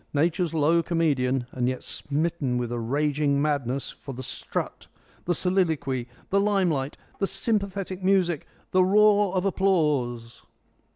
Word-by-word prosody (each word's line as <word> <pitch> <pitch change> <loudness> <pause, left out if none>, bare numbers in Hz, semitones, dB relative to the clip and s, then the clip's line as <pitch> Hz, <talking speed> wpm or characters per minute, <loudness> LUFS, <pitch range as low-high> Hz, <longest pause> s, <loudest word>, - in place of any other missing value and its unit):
Nature's 170 +3 +1
low 165 +1 +3
comedian, 135 -7 +1
and 125 -1 0
yet 130 - -4
smitten 145 -3 -2
with 120 -1 -2
a 120 - -2
raging 140 +3 +1
madness 140 -3 -1
for 135 - -9
the 130 - -6
strut, - - -5 0.4
the 175 - +1
soliloquy, 160 -9 +1 0.2
the 200 - +4
limelight, 180 -9 +1 0.2
the 195 - +1
sympathetic 195 -4 -1
music, 185 -5 +2 0.2
the 185 0 +4
roar 205 +1 +4
of 185 +1 0
applause! 150 -12 0
155 Hz, 130 wpm, -26 LUFS, 135-185 Hz, 0.4 s, the